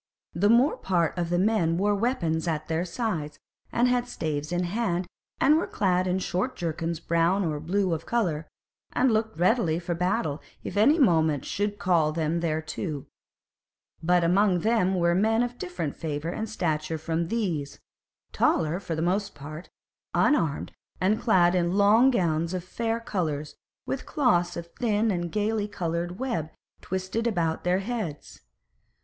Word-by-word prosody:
The 200 +5 +2
more 245 +6 +4
part 170 -4 0
of 175 -2 -2
the 175 - +1
men 180 -4 +2
wore 205 +3 +2
weapons 175 -8 0
at 155 -2 -2
their 165 +2 -1
sides 170 - -3 0.3
and 240 +1 +3
had 245 0 +1
staves 155 -8 -3
in 175 0 0
hand, 180 -1 -1 0.3
and 300 +3 +5
were - - -2
clad 185 -2 +1
in 180 +1 +1
short 190 +6 -2
jerkins 165 -1 -3
brown 170 +4 +1
or 155 -2 -2
blue 185 +3 0
of 165 0 -4
colour, 170 -10 0 0.5
and 255 0 +3
looked 220 0 0
ready 180 -2 +2
for 175 0 -3
battle 170 -4 -1 0.2
if - - -6
any 230 +10 +5
moment 160 - +3
should 205 +1 -2
call 170 -6 +2
them 160 +1 -1
thereto; 155 -1 -3 1.0
but 175 +1 +3
among 180 +1 +3
them 205 -3 +2
were 170 -1 +2
men 220 +5 +3
of 245 0 -5
different 175 -5 -4
favour 155 0 -3
and 220 +5 -4
stature 160 -5 -1
from 165 +1 -2
these, 165 -10 -2 0.5
taller 165 +2 +2
for 180 -4 -4
the 160 - -1
most 195 +3 0
part, 155 +4 -9 0.5
unarmed, 165 - +2 0.3
and 205 +4 +1
clad 180 -7 +4
in 175 0 +1
long 215 +6 +6
gowns 170 -6 0
of 180 - -3
fair 225 +5 -2
colours 160 -10 -3 0.3
with - - -4
cloths 175 - +2
of 170 - -5
thin 220 -2 +2
and 175 -2 -2
gay 210 0 0
coloured 175 -3 -3
web 190 - -2 0.3
twisted 190 +5 -2
about 170 -7 0
their 180 +1 +2
heads. 205 -9 -5
180 Hz, 160 wpm, -26 LUFS, 165-210 Hz, 1.0 s, long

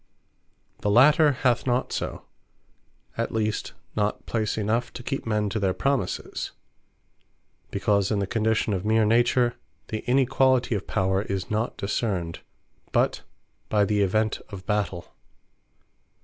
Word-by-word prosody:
The 105 - -1
later 145 +7 +6
hath 125 -1 +1
not 125 +1 0
so; - - -4 0.9
at - - -1
least 110 -1 -1 0.2
not 105 0 -1
place 110 -2 -1
enough, 110 +3 0
to 125 - -8
keep 135 -1 -3
men 105 -1 +1
to 110 - -2
their 95 -2 +1
promises; 135 -9 -2 1.2
because 100 -2 +1
in 105 - +1
the 100 - 0
condition 110 +1 +1
of 95 -2 -2
meer 110 +1 +3
Nature, 120 +2 +3 0.4
the 110 - -2
inequality 130 -1 +3
of 100 -2 -3
Power 95 -1 +1
is 100 -2 -4
not 110 +3 -1
discerned, 100 -5 -2 0.5
but - - +1 0.5
by 105 -1 +3
the 105 0 +1
event 110 +3 +1
of 100 -3 -9
Battell. 100 -4 -2
110 Hz, 135 wpm, -25 LUFS, 100-120 Hz, 1.2 s, later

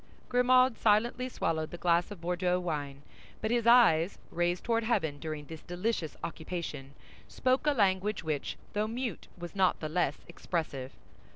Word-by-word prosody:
Grimaud 255 -1 +4
silently 235 +4 +2
swallowed 160 -8 -1
the 175 - -7
glass 170 0 +2
of 205 -5 -9
Bordeaux 180 +1 0
wine; 145 -5 -4 0.4
but 220 - -2
his 235 -1 +1
eyes, 205 -8 +5
raised 175 +1 0
toward 230 -1 +1
heaven 160 -11 0
during 155 -2 -5
this 160 +1 -9
delicious 175 -3 -3
occupation, 160 -4 -5 0.3
spoke 260 +3 0
a - - +6
language 200 - +1
which, 155 -3 -3 0.2
though 210 +1 0
mute, 235 -3 -4
was 175 +2 -8
not 190 -2 +3
the 155 - -4
less 155 -3 0
expressive. 155 -6 -4
180 Hz, 155 wpm, -30 LUFS, 160-225 Hz, 0.4 s, a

